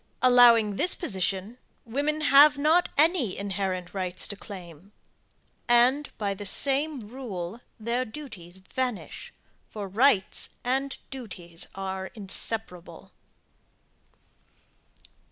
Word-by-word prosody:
Allowing 235 -5 +6
this 360 - +3
position, 195 - -3 0.3
women 290 +6 -1
have 290 0 +7
not 315 +5 +3
any 305 - +3
inherent 190 -2 -3
rights 185 -2 -1
to 205 - -3
claim; 190 -2 -11 0.7
and, 250 +4 +4
by 200 -2 -1
the 195 - -8
same 280 +6 +1
rule 215 -3 -7 0.2
their 235 +3 -1
duties 215 - -10
vanish, 245 +4 -5 0.4
for 205 -2 -6
rights 205 0 +2
and 270 +2 -1
duties 180 -10 -4
are 190 0 -4
inseparable. 200 -2 -5
220 Hz, 100 wpm, -26 LUFS, 190-270 Hz, 0.7 s, have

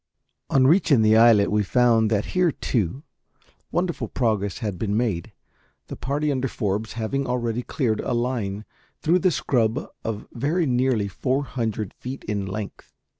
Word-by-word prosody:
On 130 -1 +4
reaching 150 - +4
the 110 0 +5
islet 110 -3 +6
we 105 0 +3
found 115 +1 +3
that 105 -2 +1
here, 180 -2 +3
too, 120 - -2 0.7
wonderful 175 -1 -1
progress 105 -6 -1
had 105 -7 -4
been 105 -1 0
made, 105 -8 -1 0.6
the - - -5
party 145 +3 -1
under 135 -1 0
Forbes 105 -1 -2
having 120 +5 -2
already 120 -1 -1
cleared 120 -4 -1
a - - -2
line 115 -4 -2 0.4
through 170 +3 +3
the 185 - +3
scrub 120 -8 +1 0.2
of 110 -2 -4
very 155 +8 0
nearly 125 -5 +1
four 130 +7 -1
hundred 110 -6 -3
feet 130 +2 -7
in 100 -2 -3
length. 100 +1 -6
115 Hz, 155 wpm, -24 LUFS, 105-135 Hz, 0.7 s, islet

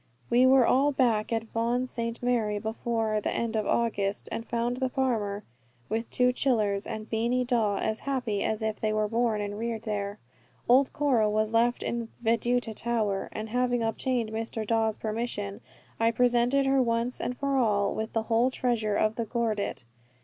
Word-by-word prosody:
We 250 +2 +5
were 260 -2 +6
all 275 +5 +3
back 235 -6 +1
at 225 -1 0
Vaughan 235 +2 -1
St. 235 -1 -4
Mary 225 -4 +1
before 220 0 -1
the - - -1
end 230 -1 -2
of 215 -1 0
August, 205 -4 0
and 230 - -3
found 235 +1 -2
the 260 -1 0
farmer, 220 -6 -1 0.5
the 220 +2 0
two 250 +2 +2
chillers, 215 -7 +1
and 215 0 -5
Beany 235 +3 0
Dawe 225 -5 +1
as 220 +2 -1
happy 245 -7 -2
as 220 0 -1
if 220 -1 -2
they 215 - 0
were 215 0 +1
born 225 -1 0
and 205 0 -4
reared 230 -1 -3
there. 205 -2 -3 0.5
Old 260 +3 +5
Cora 265 -8 +2
was 215 +1 0
left 235 +2 +2
at 235 -1 -2 0.2
Veduta 235 +1 +1
Tower; 215 -3 -1
and 215 +1 -5
having 245 0 +1
obtained 230 0 -1
Mr. 225 0 -3
Dawe's 220 0 +1
permission 215 -2 -4 0.4
I 225 0 +4
presented 245 +3 +2
her 270 0 +3
once 235 +1 -1
and 250 - -3
for 275 -1 -1
all 210 -6 +2
with 220 +1 -4
the 225 - 0
whole 230 +3 +2
treasure 235 -5 0
of 215 +1 +1
the 230 - -1
gordit. 220 - -2
230 Hz, 180 wpm, -28 LUFS, 215-245 Hz, 0.5 s, were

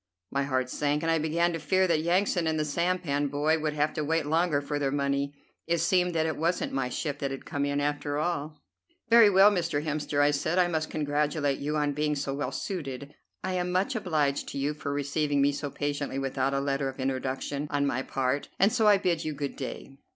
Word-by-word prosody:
My 140 0 0
heart 130 -2 0
sank, 150 +1 0
and 165 - +1
I 165 - +2
began 170 +3 +1
to 165 - -3
fear 190 +3 +2
that 165 -4 +2
Yansan 175 0 +1
and 160 0 +1
the 155 - 0
sampan 160 -2 0
boy 150 +3 +1
would 155 -1 -1
have 150 +1 0
to 155 - -2
wait 160 +1 0
longer 160 0 +2
for 145 +1 -3
their 140 -1 +1
money. 140 0 -1 0.3
It 170 +1 +2
seemed 180 +1 +2
that 160 -1 +2
it 160 -2 -2
wasn't 170 +3 0
my 135 -2 -1
ship 145 +2 -3
that 140 - -1
had 135 0 -7
come 145 -3 -2
in, 145 0 0
after 145 0 -1
all. 155 -1 -2 0.5
"Very 230 -2 +8
well, 195 +1 +7
Mr. 170 -6 -1
Hemster," 150 -1 -1
I 145 0 +5
said, 155 +4 -1
"I 180 -1 +4
must 160 -2 -2
congratulate 145 -1 0
you 150 +2 -2
on 145 -1 +1
being 150 +1 0
so 140 -1 -2
well 145 +1 -3
suited. 140 -6 -5 0.3
I 185 - -2
am 180 0 -1
much 190 +8 0
obliged 155 -9 0
to - - -6
you 140 +2 0
for 150 -1 -5
receiving 145 +1 0
me 140 +1 +4
so 145 0 -4
patiently 145 -1 -3
without 135 0 -1
a - - +1
letter 140 0 -1
of 135 - -10
introduction 135 +2 -2
on 145 0 +1
my 130 -2 0
part, 135 +1 -1
and 200 +3 +4
so 220 - +3
I 205 -1 +7
bid 175 -4 0
you 155 -1 -3
good 140 -1 -4
day." 135 +1 -7
150 Hz, 225 wpm, -28 LUFS, 140-165 Hz, 0.5 s, Very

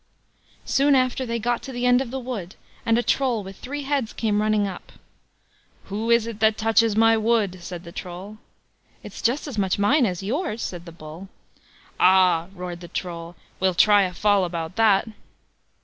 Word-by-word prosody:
Soon 280 +1 +3
after 255 0 +1
they 230 0 -1
got 235 +1 -1
to 270 - -8
the 245 -1 -3
end 245 +1 +4
of 265 - -4
the 265 +2 -4
wood, 235 -8 -6 0.3
and 230 0 +4
a 240 - +1
Troll 245 -6 +1
with 195 0 -10
three 285 +3 -5
heads 275 -5 -1
came 210 -2 0
running 215 -1 +2
up: 185 -2 -9 0.9
"Who 215 +3 -4
is 235 -1 +5
this 230 -2 -6
that 220 0 +3
touches 225 -1 +3
my 225 +1 +5
wood?" 215 -4 +1
said 175 -1 -7
the 170 - -10
Troll. 185 +5 -8 0.6
"It's - - -9
just 250 +6 0
as 245 -7 -4
much 190 -2 +1
mine 245 +6 +3
as 180 -1 -4
yours", 235 - -2
said 175 -1 -6
the - - -8
Bull. 165 +3 -11 0.7
"Ah!" 180 -2 +4
roared 175 -1 -6
the 175 - -10
Troll, 170 -1 -6 0.2
"we'll 185 -1 +1
try 205 +3 +6
a 185 -2 0
fall 205 -1 +3
about 170 0 -4
that." 220 -2 +3
215 Hz, 185 wpm, -23 LUFS, 185-235 Hz, 0.9 s, try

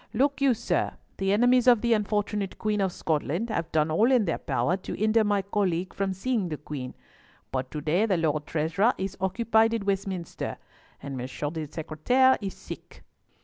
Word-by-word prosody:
Look 280 +4 +1
you, 270 -3 +4
sir, 235 - -1 0.2
the 195 0 0
enemies 245 +4 +4
of 240 -4 +6
the 235 -1 +3
unfortunate 210 -2 -1
Queen 210 -2 0
of 190 -1 +1
Scotland 165 +8 -1
have 170 -6 -2
done 155 0 +2
all 220 +11 +3
in 245 -5 +4
their 165 - -1
power 180 - 0
to 185 - -6
hinder 220 +1 +3
my 205 -2 +1
colleague 190 -3 -1
from 195 -1 -1
seeing 200 0 -1
the 155 - -3
Queen, 140 -4 -7 0.6
but 130 -1 -2
to 150 - -5
day 175 +9 +2
the 190 -4 +2
Lord 155 -2 0
Treasurer 165 +10 +1
is 190 0 -3
occupied 225 +3 +2
at 225 - -2
Westminster, 195 -3 -3 0.5
and 140 -1 -5
Monsieur 130 +4 -4
le 155 -1 -5
Secretaire 245 - +2
is 195 -2 -4
sick. - - -10
195 Hz, 185 wpm, -27 LUFS, 160-225 Hz, 0.6 s, of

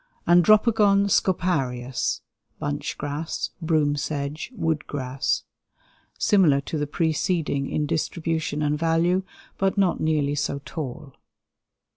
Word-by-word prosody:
Andropogon 200 +3 +5
scoparius 135 -11 0 0.4
(bunch 145 0 -3
grass; 150 +3 -3
broom 155 -3 +2
sedge; 145 - -4
wood 160 -6 -1
grass). 130 -1 -2 0.7
Similar 175 -9 +4
to 155 +2 -4
the 145 - -1
preceding 160 -2 0
in 150 - 0
distribution 160 0 -2
and 150 0 0
value, 165 +3 +2 0.4
but 195 +1 +1
not 190 -3 +2
nearly 150 -2 +1
so 145 -1 -1
tall. 150 -2 -6
155 Hz, 105 wpm, -24 LUFS, 145-175 Hz, 0.7 s, Andropogon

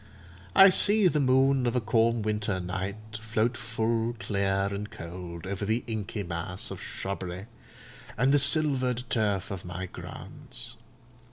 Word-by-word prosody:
I 195 0 +9
see 205 +1 +6
the 150 -3 +2
moon 130 -1 +3
of 120 - 0
a - - +3
calm 115 0 +2
winter 105 -2 -1
night, 100 +4 -5
float 110 +2 0
full, 115 0 -1
clear, 100 -3 0
and 100 +1 -4
cold, 85 0 -8
over 100 +1 -4
the 110 +4 0
inky 110 -2 -4
mass 85 +1 -4
of - - -7
shrubbery, 95 -1 -5 0.7
and 130 +5 +3
the 145 - +6
silvered 135 -4 +3
turf 105 -5 0
of 95 -3 -5
my 95 +1 -5
grounds. - - -8
110 Hz, 145 wpm, -28 LUFS, 95-125 Hz, 0.7 s, I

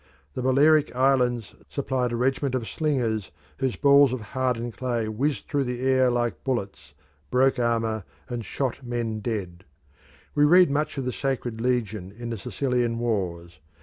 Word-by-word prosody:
The - - -4
Balearic 145 +3 +4
Islands 125 -3 +2 0.2
supplied 130 -3 -1
a - - -1
regiment 130 +2 0
of 120 -3 -2
slingers 120 - -1 0.3
whose 130 -3 0
balls 140 -2 +6
of 130 -2 -3
hardened 125 -3 -1
clay 120 -3 -1
whizzed 135 +7 -1
through 140 -2 0
the 125 0 -4
air 130 -1 +4
like 120 -1 -1
bullets, 100 - -4 0.3
broke 130 +1 +3
armour, 115 -3 0 0.2
and 120 -2 -4
shot 130 +5 -3
men 120 -3 -2
dead. 95 -6 -4 0.7
We 145 - +3
read 175 +1 +6
much 150 +1 -1
of 135 - -2
the 125 - -2
Sacred 125 -5 -2
Legion 110 -6 -1
in 120 0 -5
the 115 - -4
Sicilian 125 -1 -1
wars. 90 -8 -2
125 Hz, 155 wpm, -25 LUFS, 115-135 Hz, 0.7 s, balls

